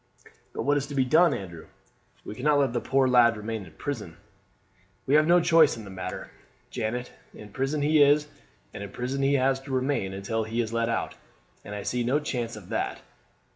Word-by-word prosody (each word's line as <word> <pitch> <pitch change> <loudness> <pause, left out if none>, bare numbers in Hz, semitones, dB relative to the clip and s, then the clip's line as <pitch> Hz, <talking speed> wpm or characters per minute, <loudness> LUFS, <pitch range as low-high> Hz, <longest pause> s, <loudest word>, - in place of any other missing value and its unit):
"But - - -4
what 145 +1 +2
is 140 -1 -2
to 145 - -7
be 130 -1 +2
done, 165 +7 +5
Andrew? 85 -4 -6 0.6
We - - -6
cannot 145 +6 +2
let 135 -4 +1
the 120 - -1
poor 135 -1 +2
lad 120 -3 +5
remain 110 0 -5
in 80 - -15
prison." - - -6 0.9
"We 135 - 0
have 155 +1 +5
no 175 +1 +6
choice 165 -6 +4
in 110 - -8
the 100 - -10
matter, 95 -1 -6 0.4
Janet. 120 +3 -3 0.2
In 105 - -11
prison 135 +6 -2
he 150 0 +4
is, 145 +1 +5 0.5
and - - -7
in 100 - -6
prison 125 +6 -3
he 135 +1 +3
has 135 0 +2
to 135 +1 -10
remain 130 -6 0
until 100 +4 -3
he 110 +2 -4
is 115 -1 -1
let 115 0 0
out, - - -2 0.5
and 105 - -7
I 100 - -5
see 125 +3 -1
no 130 +5 +1
chance 120 -6 -3
of 105 -4 -12
that. - - -2
125 Hz, 210 wpm, -26 LUFS, 110-145 Hz, 0.9 s, no